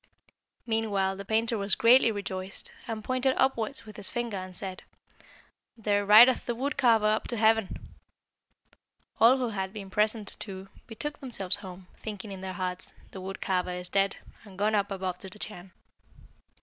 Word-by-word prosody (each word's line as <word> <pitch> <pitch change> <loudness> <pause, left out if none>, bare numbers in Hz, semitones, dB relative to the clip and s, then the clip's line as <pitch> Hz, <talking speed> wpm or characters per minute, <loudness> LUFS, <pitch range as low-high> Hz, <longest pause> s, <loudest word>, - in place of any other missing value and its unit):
"Meanwhile 210 -4 0
the 200 - -7
painter 225 +1 +1
was 200 0 +2
greatly 235 0 +6
rejoiced, 195 -2 -4 0.2
and 220 -2 -4
pointed 255 +2 +1
upwards 265 0 0
with 215 - -11
his 200 -2 +1
finger, 235 -4 -3
and 185 0 -7
said, 190 -2 -5 1.0
'There 205 -2 0
rideth 235 +5 +8
the 240 - -1
wood 275 +5 -2
carver 225 -4 +4
up 215 +1 +1
to 240 - -3
heaven.' 220 -2 +2 1.4
All 240 +4 +7
who 250 -2 -1
had 190 -3 -3
been 200 -2 -8
present, 210 +1 +1
too, 195 -2 -8 0.2
betook 295 +7 -5
themselves 210 -9 -2
home, 185 -1 -10
thinking 210 -1 -7
in 190 -1 -7
their 190 0 -5
hearts, 180 0 -4 0.2
'The 190 - -8
wood 190 +1 -7
carver 180 -1 0
is 180 0 -6
dead, 195 0 +2 0.3
and 195 -3 -14
gone 210 +2 +1
up 205 -1 +1
above 185 -2 -3
to 190 - -9
the 185 - -10
Chan.' 195 -3 -8
210 Hz, 170 wpm, -28 LUFS, 190-225 Hz, 1.4 s, rideth